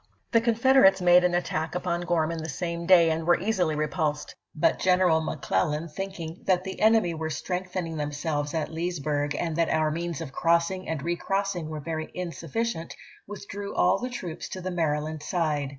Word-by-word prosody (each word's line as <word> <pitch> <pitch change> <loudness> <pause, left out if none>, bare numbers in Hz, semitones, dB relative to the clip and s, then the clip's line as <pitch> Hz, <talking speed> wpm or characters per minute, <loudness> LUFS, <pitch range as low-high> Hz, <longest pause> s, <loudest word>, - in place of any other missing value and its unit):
XXV. - - -40
The 230 - +4
Confederates 235 -3 +5
made 180 0 +6
an 180 -1 +2
attack 165 -2 -2
upon 175 -1 -1
Gorman 165 -2 0
the 160 - -5
same 170 +3 -4
day 170 -3 +6
and 160 +1 -1
were 175 - +4
easily 180 -7 0
repulsed; 150 0 -2 0.2
but 160 +2 +2
Gen 185 -1 +4
eral 165 -4 +3
McClellan, 150 - -1
thinking 175 -1 -6
"that 185 -1 +3
the 190 0 -6
enemy 220 -5 +4
were 160 0 -3
strengthening 180 0 -3
themselves 145 0 -2
at 160 -1 -2
Leesburg, 155 -3 -2
and 165 0 -2
that 165 -1 +2
Yo - - +1
sSr 155 -1 +2
o^i* - - -2
means 170 -1 -3
of 160 -5 -6
crossing 170 +4 +1
and 160 -4 -3
recrossing 175 0 -1
were 155 -1 -5
very 155 +1 -4
NoT/Jsel: - - -24
insufficient," 175 +1 -3 0.3
withdi^ew 200 0 -6
all - - +3
the 250 - -3
troops 180 -9 -6
to 185 - -6
the 185 0 -4
Mary 160 -4 +1
\^v - - -3
290.^' - - -5
land 155 -1 -6
side. 150 -4 -1
170 Hz, 200 wpm, -27 LUFS, 155-185 Hz, 0.3 s, made